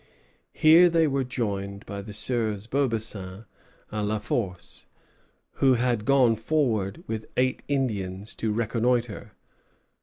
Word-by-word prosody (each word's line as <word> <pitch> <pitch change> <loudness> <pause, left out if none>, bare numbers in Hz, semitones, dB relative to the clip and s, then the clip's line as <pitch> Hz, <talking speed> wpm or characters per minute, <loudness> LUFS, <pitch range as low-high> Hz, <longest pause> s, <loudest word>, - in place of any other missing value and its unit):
Here 165 +3 +7
they 165 -1 +3
were 140 -2 0
joined 100 -5 -3
by 100 -1 -6
the 105 +2 -9
Sieurs 110 -1 -1
Beaubassin 110 -6 -2 0.5
and 105 -1 -2
La 110 +1 0
Force, 95 -4 -3 0.7
who 130 -2 +5
had 120 -3 0
gone 130 -4 +4
forward, 115 - 0
with 110 -1 -5
eight 130 0 +1
Indians, 105 -8 -2
to 110 - -2
reconnoitre. 115 +1 -1
115 Hz, 120 wpm, -26 LUFS, 105-130 Hz, 0.7 s, Here